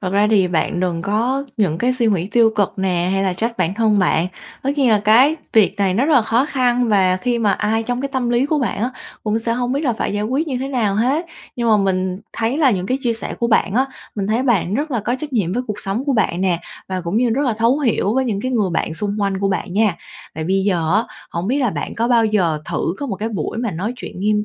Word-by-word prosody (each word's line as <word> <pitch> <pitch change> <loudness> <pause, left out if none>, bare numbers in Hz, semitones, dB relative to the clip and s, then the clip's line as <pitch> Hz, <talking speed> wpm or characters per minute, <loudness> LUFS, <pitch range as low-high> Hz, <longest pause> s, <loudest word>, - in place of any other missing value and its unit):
thật 185 -2 -3
ra 205 +1 +3
thì 190 -4 +4
bạn 175 +1 0
đừng 175 -2 -1
có 235 +8 0
những 180 -7 +1
cái 250 +4 +2
suy 245 -2 0
nghĩ 185 -5 +1
tiêu 230 -2 +5
cực 200 -2 +1
nè 180 -2 0
hay 195 0 +1
là 190 - +1
trách 230 +6 -3
bản 180 +1 0
thân 215 -2 +2
bạn. 175 -2 +2 0.4
Tất 275 - 0
nhiên 265 -4 +3
là 210 -2 +4
cái 255 +9 +5 0.2
việc 210 -2 +4
này 195 -3 +1
nó 240 +7 +2
rất 310 - +3
là 250 - +5
khó 230 +4 +2
khăn 250 -4 +1
và 190 -3 +3
khi 240 +4 -1
mà 210 -3 +2
ai 220 +2 0
trong 245 +2 -2
cái 275 - -2
tâm 245 -2 0
lý 240 +3 +2
của 305 +1 +1
bạn 240 -6 -2
á, 245 - 0 0.3
cũng 215 +1 0
sẽ 230 0 -2
hông 245 +1 -1
biết 280 - 0
là 245 - +2
phải 215 - -2
giải 205 0 -1
quyết 270 +8 -1
như 255 - -2
thế 270 +2 -3
nào 225 -7 0
hết. 265 - +1 0.3
Nhưng 235 -1 0
mà 215 - +5
mình 185 -1 0
thấy 230 +5 -1
là 290 -5 +5
những 185 -4 -1
cái 260 +1 0
chia 240 -4 0
sẻ 225 - -5
của 235 - +1
bạn 215 -3 +2
á, 260 +2 +3 0.3
mình 200 -2 -2
thấy 225 +5 +1
bạn 210 -7 +1
rất 295 +4 -1
là 240 -5 0
có 240 +4 -1
trách 300 -2 -6
nhiệm 200 -8 0
với 250 +5 -1
cuộc 210 -1 -5
sống 205 +7 -2
của 280 - +1
bạn 195 -6 +1
nè, 185 -3 +1 0.3
và 185 -1 -2
cũng 175 +4 -3
như 240 0 +2
rất 270 +6 +1
là 245 - +2
thấu 230 +6 +2
hiểu 230 -6 +1
với 265 0 +2
những 210 -5 -1
cái 255 - -2
người 215 -7 +1
bạn 165 -1 -1
xung 205 +3 -3
quanh 195 -1 0
của 195 0 0
bạn 190 -1 -2
nha. 205 -3 +2 0.4
Tại 160 - -4
bây 190 +3 +1
giờ 175 -4 +1
á, 215 - +4 0.3
hổng 170 +2 -3
biết 270 - +1
là 250 -5 +1
bạn - - -4
có 230 +1 0
bao 235 -2 +4
giờ 185 -8 +1
thử 170 - -2
có 285 - -3
một 200 -6 -3
cái 215 +4 -3
buổi 205 0 -4
mà 235 -2 -1
nói 195 +7 -3
chuyện 215 - -8
nghiêm 210 +1 +1
220 Hz, 285 wpm, -19 LUFS, 195-245 Hz, 0.4 s, tiêu